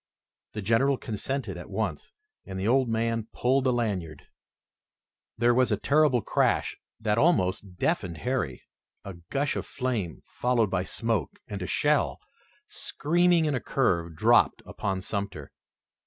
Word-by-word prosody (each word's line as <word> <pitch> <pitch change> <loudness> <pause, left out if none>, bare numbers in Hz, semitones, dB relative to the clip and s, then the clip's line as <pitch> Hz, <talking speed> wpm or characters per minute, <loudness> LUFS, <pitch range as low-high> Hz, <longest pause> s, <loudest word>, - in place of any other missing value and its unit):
The 105 - -4
General 130 +6 +3
consented 130 +5 -4
at - - -9
once, - - -3 0.3
and 95 0 -6
the 95 - -1
old 130 +1 +3
man 115 0 0
pulled 130 +2 +2
the 130 - +4
lanyard. 95 - -2 1.1
There 120 +1 +4
was 125 -1 +3
a 105 - +2
terrific 140 -1 +3
crash - - +1 0.2
that 110 0 +1
almost 100 - +1
deafened 90 - -1
Harry, 125 - -2 0.4
a 100 - -6 0.2
gush 140 +1 0
of - - -4
flame, 115 - -3
followed 120 -5 0
by 90 -1 0
smoke, 115 -8 -1
and 100 -2 -5
a 90 - -3
shell, 150 0 +1 0.5
screaming 175 +2 +1
in 150 - +1
a 130 - 0
curve, 85 -11 0
dropped - - +4
upon 95 -2 -3
Sumter. 100 -7 -5
115 Hz, 140 wpm, -27 LUFS, 95-130 Hz, 1.1 s, the